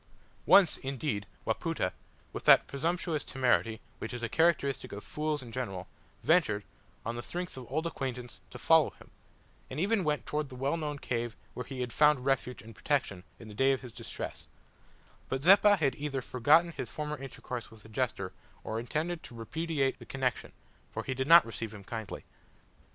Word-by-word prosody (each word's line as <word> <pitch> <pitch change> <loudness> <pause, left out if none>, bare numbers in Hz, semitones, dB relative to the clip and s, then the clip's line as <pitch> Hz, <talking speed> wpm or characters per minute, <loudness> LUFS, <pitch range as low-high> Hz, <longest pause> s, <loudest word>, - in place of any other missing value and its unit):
Once, 190 -5 +7
indeed, 130 -7 -3 0.2
Wapoota, - - -1 0.4
with - - -6
that - - +8
presumptuous 160 +2 -1
temerity 120 -4 +1 0.2
which 115 - -5
is 120 - -6
a - - +1
characteristic 155 -3 +2
of 100 +1 -7
fools 150 -2 -2
in 120 - -10
general, 95 -7 -4 0.4
ventured, 145 - +3 0.4
on 115 +1 -2
the 120 - -4
strength 175 +7 -5
of 130 -2 -8
old 155 +4 0
acquaintance, 125 -6 -4
to - - -9
follow - - +5
him, - - -17 0.6
and 130 - -4
even 200 +2 +2
went 150 -2 0
towards 150 -1 -2
the 130 - -9
well 135 +5 0
known 150 -3 -3
cave 120 -4 -3 0.2
where 125 - -6
he 135 -2 -5
had 125 -1 -3
found 150 -4 +4
refuge 130 -2 0
and 115 +1 -11
protection 110 -11 -1
in 115 - -11
the 105 - -9
day 135 +5 +4
of 135 - -2
his 125 -3 -9
distress; 115 -1 -7 0.8
but 130 +1 -2
Zeppa 200 +3 +7
had 140 -6 +2
either 140 -3 -3
forgotten 155 +9 +4
his - - -5
former 150 -1 -4
intercourse 125 -3 -6
with 110 -2 -16
the 110 - -14
jester 110 -5 -2 0.3
or 110 +1 -3
intended 160 +8 -2
to 120 - -11
repudiate 140 +3 -1
the - - -11
connection, 130 -2 -1 0.4
for - - -4
he 130 - -2
did 130 +1 -2
not 170 +1 +9
receive 115 0 -5
him 100 - -10
kindly. 110 +1 -6
135 Hz, 185 wpm, -31 LUFS, 115-150 Hz, 0.8 s, not